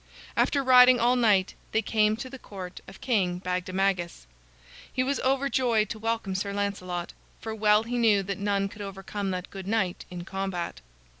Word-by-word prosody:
After 280 -1 +2
riding 250 -1 +7
all 245 +2 +3
night, 210 -6 +3 0.2
they 220 - +2
came 215 0 +2
to 240 - -6
the 265 0 -10
court 185 -5 -9
of 195 - -13
King 190 -8 +1
Bagdemagus. 180 - -1 0.7
He 255 - 0
was 275 +1 -1
overjoyed 260 -5 +1
to 220 - -5
welcome 225 -3 -2
Sir 200 +1 -2
Lancelot, 185 -4 -3 0.3
for 220 - -5
well 210 0 +3
he 240 +1 -2
knew 210 -4 +4
that 195 +1 -4
none 200 -1 0
could 205 +1 -11
overcome 195 0 -5
that 185 0 -4
good 195 -1 -8
knight 195 -4 -1
in 175 -1 -7
combat. 190 -3 -4
205 Hz, 170 wpm, -27 LUFS, 190-230 Hz, 0.7 s, riding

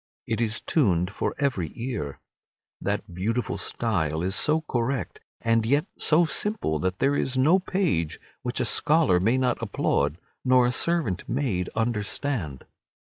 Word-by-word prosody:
It 115 0 -2
is 115 -1 -1
tuned, 95 - +1
for - - -2
every 130 - -1
ear. 115 - -4 0.6
That - - -3
beautiful 115 +7 -2
style 80 -9 -1
is 95 +1 -1
so 155 +9 +3
correct 130 -2 -2 0.2
and 115 -1 +2
yet 140 +7 +2
so 165 +2 +4
simple 160 - 0
that 90 +3 -1
there 140 +4 +2
is 130 -2 -1
no 155 +9 +5
page 170 - -1 0.2
which - - -3
a - - +1
scholar 150 - +3
may 115 +8 +2
not 125 -2 0
applaud 80 -8 0 0.3
nor 130 -1 +5
a 125 - +2
servant 150 - 0
maid 115 -10 -1
understand. 110 - -2
115 Hz, 145 wpm, -26 LUFS, 90-140 Hz, 0.6 s, no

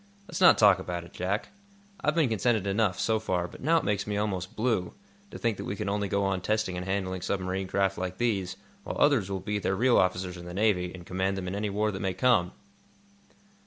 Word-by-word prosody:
Let's - - -5
not 180 - +8
talk 100 -3 +6
about 85 -1 -4
it, 85 - -14
Jack. 95 +5 -2 0.5
I've 150 - +2
been 160 -5 +3
contented 110 -1 +1
enough, 100 -2 +1
so 110 -1 +1
far, 90 -5 -1
but - - -13
now 165 +4 +3
it - - 0
makes 105 0 -1
me 105 -1 -1
almost 95 -3 -2
blue, 110 -6 0 0.3
to - - -8
think 115 -4 -1
that - - -6
we 100 - -3
can - - -4
only 100 0 0
go 100 +1 0
on 95 -1 0
testing 110 -2 0
and 90 +1 -5
handling 95 -1 -2
submarine 95 0 -2
craft 95 0 0
like 95 0 -4
these, 95 -6 0 0.3
while - - -5
others 135 -10 +3
will 95 -1 -2
be 105 +2 -2
their 95 - 0
real 120 +5 +4
officers 90 0 0
in 85 - -9
the 90 0 -7
Navy, 95 -4 +1
and 90 -2 -10
command 95 +2 -1
them 95 -1 -4
in 90 - -3
any 105 +1 -2
war 105 +2 0
that 95 - -5
may 95 -2 -1
come." 95 -4 +3
95 Hz, 235 wpm, -28 LUFS, 90-105 Hz, 0.5 s, not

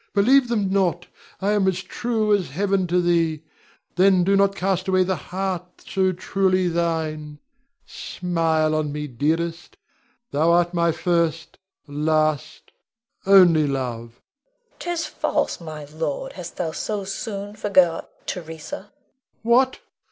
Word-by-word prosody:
Believe 250 +6 +5
them 210 -5 0
not. 180 -3 +1 0.4
I 200 - +2
am 205 -2 +2
as 185 -1 0
true 220 +1 0
as 195 -4 +1
Heaven 190 +4 0
to 180 +1 +2
thee; 165 -3 +1 0.5
then 185 -1 +5
do 195 +2 +3
not 200 0 +3
cast 190 -1 -1
away 185 -1 +3
the 190 +1 0
heart 180 +2 -5
so 190 -1 +1
truly 185 0 +1
thine. 160 -3 -2 0.5
Smile 165 -3 -1
on 155 -1 -1
me, 150 +1 -4
dearest; 165 - -2 0.5
thou 160 +4 +3
art 175 0 +2
my 170 -1 +2
first, 165 -1 -1 0.3
last, 155 0 -1 0.6
only 175 -6 +6
love. 120 -4 -4 0.2
Leonore. - - -41
'Tis 345 -2 -2
false, 305 - -1
my 155 -2 -7
lord! 150 0 -4
Hast 175 -2 -9
thou 165 -3 -2
so 205 +5 -3
soon 200 +1 -5
forgot 185 -5 +2 0.2
Theresa? 160 - -7 0.5
Rod. 255 +3 +3
What! - - -26
180 Hz, 135 wpm, -23 LUFS, 160-195 Hz, 0.6 s, only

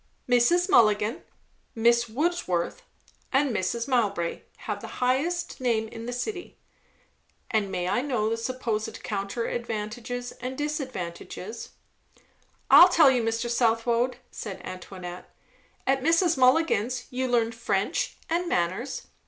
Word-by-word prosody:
"Mrs. 255 +9 +4
Mulligan, 220 - +3 0.5
Miss 235 +1 +3
Wordsworth, 290 - -1 0.5
and 270 -3 +2
Mrs. 230 +6 -1
Mowbray, 205 -10 0 0.2
have - - -3
the - - -8
highest 290 +7 0
name 225 -3 +1
in 230 +1 -8
the - - -3
city." 360 - -5 0.9
"And 210 -3 +1
may 180 -1 -2
I 245 +6 +1
know 245 -6 0
the 225 - +1
supposed 230 -2 -3
counter 200 +3 -3
advantages 240 +2 -4
and 255 +1 -4
disadvantages?" 235 - -5 1.0
"I'll 355 - +10
tell 315 -6 +6
you, 250 -2 +2
Mr. 225 +1 -1
Southwode," 235 +1 +1
said 200 -4 -6
Antoinette. 180 -1 -8 0.6
"At 270 0 +2
Mrs. 330 +3 +3
Mulligan's 255 -3 +2
you 255 +1 -1
learn 235 -2 +2
French 205 -4 -1
and 345 +2 -1
manners. 185 - -1
240 Hz, 120 wpm, -26 LUFS, 215-265 Hz, 1.0 s, I'll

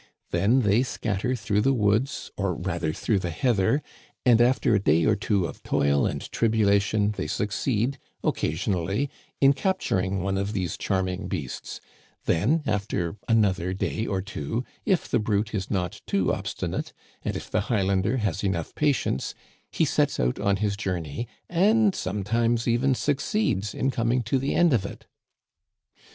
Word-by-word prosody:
Then 120 +7 +3
they 105 +1 +3
scatter 125 -1 -1
through 105 -3 0
the 135 +4 +3
woods, 110 +4 0
or 95 -3 -1
rather 85 -3 -2
through 100 +5 0
the 90 - -3
heather, 115 - +1 0.4
and 120 -2 +6
after 120 -1 +3
a 105 - +4
day 80 -3 +3
or 110 - +4
two 100 -2 0
of - - -7
toil 70 0 +2
and - - -3
tribulation 105 -2 +2
they 105 - -4
succeed, 115 +5 -1 0.2
occasionally, 95 - -1 0.3
in 135 0 +7
capt 190 +6 -1
uring 95 0 0
one 95 +1 -1
of 100 +2 -2
these 95 -5 -2
charming 95 0 -1
beasts; 65 -5 -5 0.5
then, 125 - +2
after 100 -5 -1
another 95 -5 +2
day 110 +3 -2
or 95 -2 -1
two, 105 - -3 0.2
if 190 -5 +2
the - - +1
brute 105 +1 0
is 95 -3 -2
not 90 -4 -2
too - - +1
obstinate, - - -3 0.3
and - - -3
if - - -7
the - - +2
Highlander 100 +1 +1
has 100 -5 -1
enough 95 -5 -1
patience, 140 - 0 0.3
he - - +1
sets - - +1
out 60 +6 0
on 100 -1 +2
his 100 0 0
journey, 90 +1 -3 0.2
and 205 +4 +3
sometimes 115 - 0
even 125 +3 +2
succeeds 140 - 0
in 135 - 0
coming 120 +1 +1
to 125 +4 +1
the 135 +2 -1
end 175 -4 +4
of 110 -6 +2
it." 100 - -8
105 Hz, 160 wpm, -26 LUFS, 95-120 Hz, 0.5 s, in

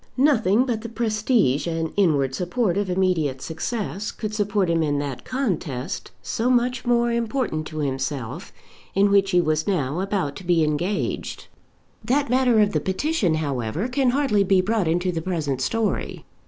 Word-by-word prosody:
Nothing 250 -5 +3
but 235 -4 -2
the 230 - -6
prestige 215 - +1
and 165 -1 -2
inward 145 -9 +2
support 180 - 0
of 200 -1 -1
immediate 180 -7 +1
success 195 - -4
could 215 -1 -5
support 205 -2 +1
him 165 -1 +1
in 145 -2 +1
that 140 -3 -4
contest, 185 - -3
so 230 +3 -1
much 250 0 +1
more 240 0 +3
important 230 - -1
to 155 - -8
himself, 135 +1 -3 0.4
in 200 +1 +4
which 195 -1 +4
he 180 -2 +3
was 155 -2 0
now 160 -5 0
about 190 -7 -1
to - - -9
be 175 -2 +3
engaged. 165 +7 -2 0.6
That 265 +4 +1
matter 250 -3 +4
of 205 - +3
the 155 - +1
petition, 190 - 0
however, 140 - -2
can 255 0 +1
hardly 245 -6 +2
be 190 -1 +3
brought 200 0 +1
into 175 +3 +1
the 165 -2 -3
present 155 -7 -2
story. 225 - -1
190 Hz, 165 wpm, -23 LUFS, 155-230 Hz, 0.6 s, in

